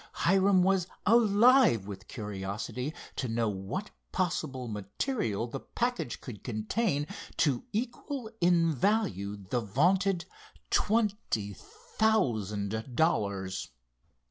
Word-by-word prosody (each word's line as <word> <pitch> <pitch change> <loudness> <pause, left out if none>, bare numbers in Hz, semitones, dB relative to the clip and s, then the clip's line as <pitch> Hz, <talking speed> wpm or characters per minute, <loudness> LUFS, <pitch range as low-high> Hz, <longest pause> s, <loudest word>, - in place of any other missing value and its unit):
Hiram 190 +1 +4
was 190 -2 +2 0.2
alive 225 - +5
with 95 -2 -8
curiosity 105 +6 -4 0.3
to 130 - -1
know 115 -1 0
what 100 - -4 0.2
possible 150 -8 -1
material 105 - -2
the 130 +3 -5
package 240 - -2
could 105 -6 -9
contain 140 - 0 0.3
to 145 - +2
equal 245 +3 -3
in 170 -2 +4
value 145 - 0
the 100 +5 -2
vaunted 175 - +2 0.5
twenty 205 - +1
thousand 110 - -1
dollars. 100 - 0
140 Hz, 95 wpm, -30 LUFS, -, 0.5 s, alive